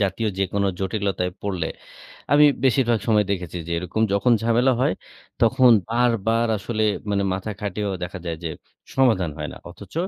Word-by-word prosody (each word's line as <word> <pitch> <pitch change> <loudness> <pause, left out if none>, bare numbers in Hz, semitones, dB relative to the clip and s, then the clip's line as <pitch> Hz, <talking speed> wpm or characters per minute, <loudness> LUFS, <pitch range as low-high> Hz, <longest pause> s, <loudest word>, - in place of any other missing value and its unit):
জাতীয় 105 +3 0
যেকোনো 100 +1 0
জটিলতায় 95 -2 -2
পড়লে 95 -5 -2 0.6
আমি 150 +1 +7 0.2
বেশিরভাগ 120 -3 +3
সময় 105 -2 +4
দেখেছি 90 -2 -3
যে, 85 - -7
এরকম 90 +5 -2
যখন 100 +5 +3
ঝামেলা 120 +3 +3
হয় 130 - +2 0.5
তখন 125 -1 +5 0.2
বারবার 115 -1 +1
আসলে 110 +2 -3 0.3
মানে 100 -1 +1
মাথা 95 +3 -4
খাটিয়েও 105 -1 -2
দেখা 95 +2 -7
যায় 85 -1 -2
যে, 80 - -1 0.5
সমাধান 110 -11 +3
হয় 75 0 -4
না। - - -11
অথচ 100 +3 -13
100 Hz, 155 wpm, -23 LUFS, 95-115 Hz, 0.6 s, আমি